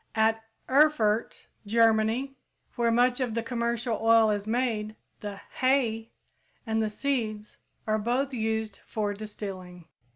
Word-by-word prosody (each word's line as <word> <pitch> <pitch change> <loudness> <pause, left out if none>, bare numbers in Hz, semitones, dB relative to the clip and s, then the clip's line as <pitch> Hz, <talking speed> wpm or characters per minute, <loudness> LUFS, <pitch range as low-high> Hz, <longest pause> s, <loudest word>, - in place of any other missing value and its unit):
At 225 0 +2 0.2
Erfurt, 260 -6 +2 0.2
Germany, 225 +4 +2 0.4
where 235 -1 +2
much 245 +2 +3
of 245 -4 -1
the 230 - -1
commercial 235 -1 -1
oil 225 -1 +5
is 205 0 -2
made, 220 -2 -1 0.2
the 205 -1 -6 0.2
"hay" 240 -4 +1 0.6
and 225 -1 0
the 215 - 0
seeds 215 -4 -3 0.3
are 215 0 +1
both 255 +5 -1
used 220 -3 -2
for 210 -2 -3
distilling. 195 -4 -8
225 Hz, 125 wpm, -28 LUFS, 215-240 Hz, 0.6 s, oil